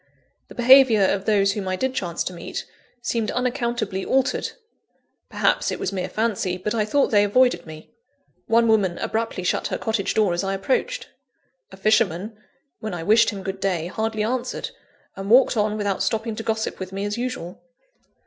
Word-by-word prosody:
The -, -, -13 dB
behaviour 245 Hz, -3 st, +6 dB
of 195 Hz, 0 st, +1 dB
those 200 Hz, -2 st, +3 dB
whom 200 Hz, -1 st, -4 dB
I 185 Hz, -, 0 dB
did 260 Hz, +6 st, -1 dB
chance 175 Hz, -8 st, -2 dB
to 185 Hz, -, -5 dB
meet, 170 Hz, -, -6 dB, 0.4 s
seemed 230 Hz, -3 st, -1 dB
unaccountably 240 Hz, -6 st, -2 dB
altered; 265 Hz, 0 st, 0 dB, 0.8 s
perhaps -, -, +1 dB
it -, -, -3 dB
was 190 Hz, -, -3 dB
mere 185 Hz, -1 st, -3 dB
fancy, 210 Hz, -5 st, -1 dB
but 210 Hz, +4 st, -3 dB
I 215 Hz, -2 st, +1 dB
thought 280 Hz, +6 st, +1 dB
they 205 Hz, -2 st, +5 dB
avoided 205 Hz, -4 st, +2 dB
me. 155 Hz, 0 st, -11 dB, 0.6 s
One 230 Hz, 0 st, +4 dB
woman 200 Hz, -6 st, +2 dB
abruptly 225 Hz, -4 st, -2 dB
shut 180 Hz, -, 0 dB
her -, -, -3 dB
cottage 220 Hz, -3 st, -1 dB
door 210 Hz, -5 st, +3 dB
as 175 Hz, -, -1 dB
I 195 Hz, 0 st, -1 dB
approached. 475 Hz, -, -1 dB, 0.6 s
A -, -, -12 dB
fisherman, 210 Hz, -1 st, +1 dB, 0.4 s
when 215 Hz, -4 st, -4 dB
I 165 Hz, -, -5 dB
wished 220 Hz, +4 st, +5 dB
him 195 Hz, -3 st, -6 dB
good 195 Hz, 0 st, -5 dB
day, 185 Hz, -4 st, -1 dB
hardly 220 Hz, +3 st, -2 dB
answered; 245 Hz, +3 st, -3 dB, 0.4 s
and 195 Hz, +1 st, -6 dB
walked 250 Hz, +2 st, +5 dB
on 210 Hz, -1 st, 0 dB
without 205 Hz, -2 st, -1 dB
stopping 225 Hz, 0 st, -1 dB
to -, -, -3 dB
gossip 220 Hz, -1 st, -2 dB
with 185 Hz, -1 st, -6 dB
me 195 Hz, +1 st, -3 dB
as 205 Hz, +3 st, -3 dB
usual. 245 Hz, -9 st, -5 dB
210 Hz, 180 wpm, -23 LUFS, 190-230 Hz, 0.8 s, behaviour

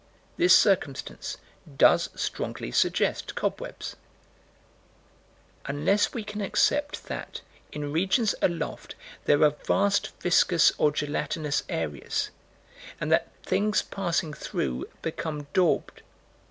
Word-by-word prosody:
This 350 Hz, +1 st, +6 dB
circumstance 170 Hz, -9 st, 0 dB, 0.4 s
does -, -, +5 dB
strongly -, -, -4 dB
suggest -, -, +1 dB
cobwebs -, -, -4 dB, 1.7 s
Unless 155 Hz, +9 st, +2 dB
we 230 Hz, -, -4 dB
can 210 Hz, 0 st, -6 dB
accept 290 Hz, +8 st, +1 dB
that, -, -, -6 dB, 0.3 s
in 145 Hz, -1 st, -4 dB
regions 195 Hz, +6 st, +2 dB
aloft, 170 Hz, -2 st, -2 dB, 0.3 s
there 145 Hz, -, +4 dB
are 150 Hz, -, +6 dB, 0.2 s
vast 200 Hz, 0 st, +2 dB
viscous 175 Hz, -1 st, +4 dB
or 150 Hz, -, +5 dB
gelatinous 150 Hz, 0 st, -1 dB
areas, 75 Hz, -4 st, -2 dB, 0.7 s
and -, -, -2 dB
that -, -, +2 dB
things 210 Hz, +1 st, +1 dB
passing 170 Hz, -5 st, -2 dB
through 65 Hz, -, -3 dB
become 155 Hz, -2 st, -4 dB
daubed. 180 Hz, -4 st, +1 dB
170 Hz, 100 wpm, -27 LUFS, 145-200 Hz, 1.7 s, This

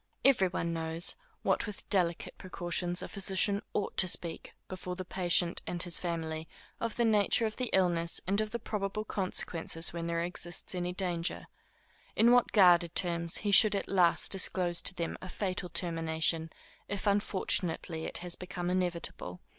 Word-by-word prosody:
Every 255 Hz, -9 st, +5 dB
one 170 Hz, -1 st, -3 dB
knows, 165 Hz, +1 st, -1 dB, 0.3 s
with -, -, +1 dB
what 210 Hz, -, -6 dB
delicate 175 Hz, -4 st, +1 dB
precautions 175 Hz, -1 st, -2 dB
a -, -, -5 dB
physician 200 Hz, +1 st, 0 dB
ought 205 Hz, -, -2 dB
to 185 Hz, -, +6 dB
speak 170 Hz, -1 st, -2 dB
before 180 Hz, -1 st, -6 dB
the 185 Hz, 0 st, -6 dB
patient 175 Hz, -2 st, +1 dB
and 175 Hz, -1 st, -1 dB
his 175 Hz, -1 st, -1 dB
family, 160 Hz, -2 st, -4 dB, 0.3 s
of 230 Hz, -1 st, -3 dB
the 235 Hz, -, +1 dB
nature 215 Hz, +1 st, +3 dB
of 215 Hz, -, -4 dB
the 250 Hz, -2 st, -2 dB
illness 175 Hz, -3 st, +2 dB
and 200 Hz, +4 st, +1 dB
of 215 Hz, -, -3 dB
the 235 Hz, -, -3 dB
probable 215 Hz, -1 st, -4 dB
consequences 170 Hz, -4 st, 0 dB
when 170 Hz, -1 st, -4 dB
there 170 Hz, 0 st, -1 dB
exists 175 Hz, 0 st, -4 dB
any 180 Hz, -1 st, -2 dB
danger; 180 Hz, -2 st, -2 dB, 0.7 s
in 235 Hz, +2 st, +5 dB
what 245 Hz, -1 st, +4 dB
guarded 175 Hz, -4 st, +5 dB
terms 170 Hz, -2 st, 0 dB
he 205 Hz, -, +1 dB
should 215 Hz, +1 st, +8 dB
at 200 Hz, -, -2 dB
last 180 Hz, -3 st, +3 dB
disclose 180 Hz, -2 st, +1 dB
to 180 Hz, -, +1 dB
them 170 Hz, -2 st, -4 dB
a 185 Hz, -, -8 dB
fatal 185 Hz, -2 st, -3 dB
termination, 165 Hz, -1 st, 0 dB, 0.4 s
if 200 Hz, 0 st, -4 dB
unfortunately 185 Hz, -5 st, 0 dB
it -, -, -2 dB
has 175 Hz, -, -1 dB
become 180 Hz, -1 st, -4 dB
inevitable. 175 Hz, -, -3 dB
180 Hz, 165 wpm, -31 LUFS, 170-195 Hz, 0.7 s, should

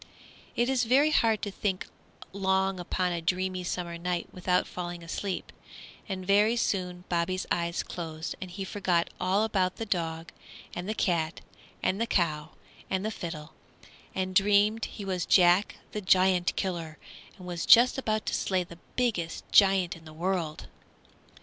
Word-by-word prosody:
It 240 Hz, -, +2 dB
is 255 Hz, -2 st, +2 dB
very 275 Hz, +6 st, +4 dB
hard 225 Hz, -6 st, +2 dB
to 205 Hz, -, -2 dB
think 190 Hz, -1 st, -2 dB, 0.5 s
long 190 Hz, -1 st, +1 dB
upon 180 Hz, +1 st, -1 dB
a 170 Hz, -1 st, -2 dB
dreamy 185 Hz, +2 st, -1 dB
summer 175 Hz, -1 st, -4 dB
night 175 Hz, 0 st, -2 dB
without 180 Hz, 0 st, +1 dB
falling 175 Hz, -1 st, -6 dB
asleep, 185 Hz, +2 st, -4 dB, 0.6 s
and 185 Hz, -1 st, -4 dB
very 205 Hz, +4 st, +4 dB
soon 180 Hz, -6 st, -1 dB
Bobby's 175 Hz, +2 st, -1 dB
eyes 170 Hz, 0 st, 0 dB
closed 160 Hz, -2 st, -5 dB
and 185 Hz, -, -5 dB
he 195 Hz, +2 st, -5 dB
forgot 185 Hz, -3 st, 0 dB
all 185 Hz, +3 st, +2 dB
about 190 Hz, -4 st, +1 dB
the 225 Hz, -, -4 dB
dog 165 Hz, -4 st, -2 dB, 0.4 s
and 175 Hz, +3 st, -5 dB
the 215 Hz, -, -1 dB
cat 170 Hz, -5 st, 0 dB, 0.4 s
and 195 Hz, +4 st, +1 dB
the 230 Hz, -, +1 dB
cow 155 Hz, -7 st, 0 dB, 0.4 s
and 190 Hz, +1 st, -1 dB
the 220 Hz, -, -1 dB
fiddle, 160 Hz, -6 st, -7 dB, 0.6 s
and 185 Hz, 0 st, -2 dB
dreamed 205 Hz, +3 st, +4 dB
he 205 Hz, -, -8 dB
was 185 Hz, -3 st, -2 dB
Jack 180 Hz, +2 st, +5 dB, 0.2 s
the 210 Hz, -, -4 dB
Giant 185 Hz, -1 st, +3 dB
Killer 170 Hz, -5 st, -3 dB, 0.4 s
and 185 Hz, -, -11 dB
was 175 Hz, -2 st, -4 dB
just 245 Hz, +3 st, +7 dB
about 215 Hz, -4 st, -1 dB
to -, -, -2 dB
slay 185 Hz, -2 st, +1 dB
the 170 Hz, -1 st, -13 dB, 0.2 s
biggest 215 Hz, -10 st, -1 dB
giant 195 Hz, -2 st, +5 dB
in 165 Hz, -1 st, -15 dB
the 155 Hz, -, -11 dB
world. 170 Hz, -2 st, -2 dB
185 Hz, 160 wpm, -28 LUFS, 175-200 Hz, 0.6 s, just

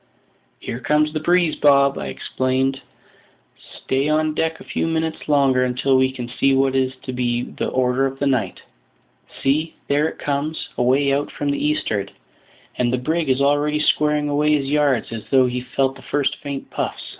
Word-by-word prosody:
"Here 115 Hz, -, -5 dB
comes 150 Hz, +3 st, +1 dB
the 155 Hz, -, -1 dB
breeze, 175 Hz, 0 st, +2 dB
Bob!" 140 Hz, -1 st, +4 dB
I -, -, -4 dB
exclaimed. 130 Hz, +1 st, -1 dB, 1.0 s
"Stay 135 Hz, +3 st, 0 dB
on 155 Hz, 0 st, +1 dB
deck 160 Hz, +1 st, -1 dB
a -, -, -11 dB
few -, -, -2 dB
minutes 160 Hz, -1 st, -2 dB
longer 135 Hz, -3 st, +3 dB
until 130 Hz, +2 st, +1 dB
we 130 Hz, 0 st, +3 dB
can 125 Hz, -2 st, -6 dB
see 135 Hz, +2 st, +1 dB
what 135 Hz, 0 st, +2 dB
is 130 Hz, 0 st, 0 dB
to 130 Hz, -, -5 dB
be 120 Hz, -1 st, -1 dB
the -, -, -4 dB
order 130 Hz, +1 st, +1 dB
of 135 Hz, 0 st, -7 dB
the 140 Hz, -, -1 dB
night. 125 Hz, -9 st, -1 dB, 0.8 s
See, 155 Hz, +4 st, +1 dB
there 145 Hz, +2 st, +2 dB
it -, -, -12 dB
comes, 145 Hz, +2 st, -3 dB
away 135 Hz, +3 st, +2 dB
out 145 Hz, +1 st, -1 dB
from 145 Hz, -1 st, -2 dB
the 140 Hz, -, -2 dB
eastward; 110 Hz, -10 st, -1 dB, 0.7 s
and 120 Hz, -1 st, +2 dB
the 125 Hz, -, +1 dB
brig 160 Hz, +5 st, -1 dB
is 130 Hz, +1 st, +2 dB
already 145 Hz, +1 st, +2 dB
squaring 150 Hz, -1 st, +2 dB
away 150 Hz, +1 st, +2 dB
his 135 Hz, -1 st, -3 dB
yards, 145 Hz, -6 st, +1 dB
as 115 Hz, -2 st, -5 dB
though 130 Hz, -2 st, +5 dB
he 125 Hz, 0 st, -2 dB
felt 135 Hz, +1 st, -1 dB
the 135 Hz, -, -13 dB
first 140 Hz, +2 st, -1 dB
faint 140 Hz, -1 st, -6 dB
puffs. -, -, -4 dB
140 Hz, 185 wpm, -21 LUFS, 130-150 Hz, 1.0 s, though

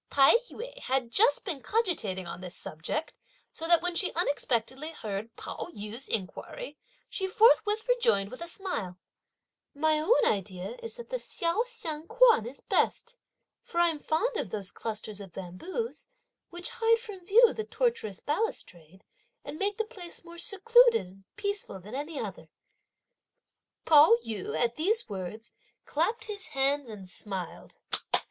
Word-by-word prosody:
Tai 275 Hz, -1 st, +6 dB, 0.2 s
yü -, -, -8 dB
had 260 Hz, -, -1 dB
just 470 Hz, -, +4 dB
been 325 Hz, -9 st, -3 dB
cogitating 310 Hz, -, 0 dB
on 175 Hz, +1 st, -7 dB
this 180 Hz, -2 st, -7 dB
subject, 165 Hz, -, -4 dB, 0.4 s
so 325 Hz, -, -4 dB
that 340 Hz, -1 st, +5 dB
when 355 Hz, 0 st, 0 dB
she 370 Hz, +2 st, +2 dB
unexpectedly 285 Hz, -2 st, 0 dB
heard 215 Hz, -3 st, -5 dB
Pao -, -, -6 dB
yü's 215 Hz, +6 st, -6 dB
inquiry, 225 Hz, -, -4 dB, 0.3 s
she 380 Hz, -, -2 dB
forthwith 435 Hz, +2 st, +4 dB
rejoined 210 Hz, -, +2 dB
with 255 Hz, -, -9 dB
a 340 Hz, -, -4 dB
smile: 280 Hz, -, -2 dB, 0.8 s
"My 310 Hz, +1 st, +3 dB
own 410 Hz, +11 st, +4 dB
idea 190 Hz, -, -1 dB
is 460 Hz, 0 st, -7 dB
that 475 Hz, 0 st, -10 dB
the -, -, 0 dB
Hsio 390 Hz, +7 st, -1 dB
Hsiang 330 Hz, -10 st, -5 dB
Kuan 465 Hz, -, +5 dB
is 265 Hz, +3 st, -9 dB
best; 470 Hz, +2 st, 0 dB, 0.5 s
for 340 Hz, -, -4 dB
I'm 335 Hz, -3 st, +3 dB
fond 430 Hz, +12 st, 0 dB
of 210 Hz, -, -2 dB
those 200 Hz, -1 st, -4 dB
clusters 215 Hz, -2 st, -5 dB
of 190 Hz, -4 st, -11 dB
bamboos, 335 Hz, -, -5 dB, 0.4 s
which 350 Hz, 0 st, -3 dB
hide 460 Hz, -1 st, +3 dB
from 410 Hz, -5 st, -9 dB
view 440 Hz, +5 st, +6 dB
the 440 Hz, -, -3 dB
tortuous 455 Hz, -, -1 dB
balustrade 190 Hz, -, -3 dB, 0.4 s
and 310 Hz, -, -7 dB
make 400 Hz, 0 st, 0 dB
the 445 Hz, -, 0 dB
place 355 Hz, -5 st, -9 dB
more 340 Hz, 0 st, -10 dB
secluded 460 Hz, -, +5 dB
and 190 Hz, +2 st, -16 dB
peaceful 405 Hz, -, -3 dB
than 205 Hz, +5 st, -11 dB
any 290 Hz, +2 st, -4 dB
other!" 185 Hz, -7 st, -6 dB, 1.4 s
Pao 295 Hz, -6 st, +8 dB
yü 220 Hz, -4 st, -3 dB
at 235 Hz, -1 st, +1 dB
these 420 Hz, +9 st, +1 dB
words 205 Hz, +3 st, -6 dB, 0.3 s
clapped 445 Hz, 0 st, 0 dB
his 420 Hz, -3 st, -5 dB
hands 275 Hz, -2 st, +1 dB
and 200 Hz, -4 st, -9 dB
smiled. 185 Hz, -1 st, -6 dB
315 Hz, 150 wpm, -29 LUFS, -, 1.4 s, Pao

